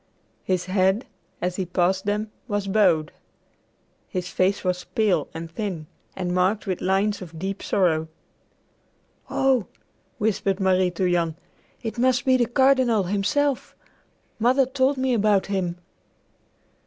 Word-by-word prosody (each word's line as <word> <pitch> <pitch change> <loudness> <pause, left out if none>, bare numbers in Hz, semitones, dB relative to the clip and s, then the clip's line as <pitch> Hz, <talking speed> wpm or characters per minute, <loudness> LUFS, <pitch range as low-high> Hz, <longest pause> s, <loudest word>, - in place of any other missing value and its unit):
His 185 -1 -1
head, 190 +4 +2 0.4
as 180 0 -1
he 190 - -1
passed 185 +2 +1
them, 210 +1 -1 0.2
was 205 -3 -2
bowed. 185 -7 +3 1.0
His 180 -1 -3
face 190 +2 +1
was 180 -1 -1
pale 190 -9 +1
and 165 0 -7
thin, 185 -5 -4 0.3
and 180 -1 -2
marked 185 +4 +1
with 185 -3 -2
lines 200 +2 +1
of 165 -3 -9
deep 195 +4 -4
sorrow. 160 -5 +1 1.2
"Oh," 260 -7 +2 0.5
whispered 205 -2 0
Marie 185 -1 +3
to 180 +1 -1
Jan, 170 -3 +1 0.5
"it 230 +1 -4
must 255 +1 +2
be 260 -1 +5
the 240 -2 +2
Cardinal 255 -4 +3
himself. 205 +9 0 0.6
Mother 255 +4 +4
told 265 +1 +1
me 260 -1 +1
about 210 -3 +3
him." 185 -3 -2
195 Hz, 130 wpm, -24 LUFS, 180-225 Hz, 1.2 s, be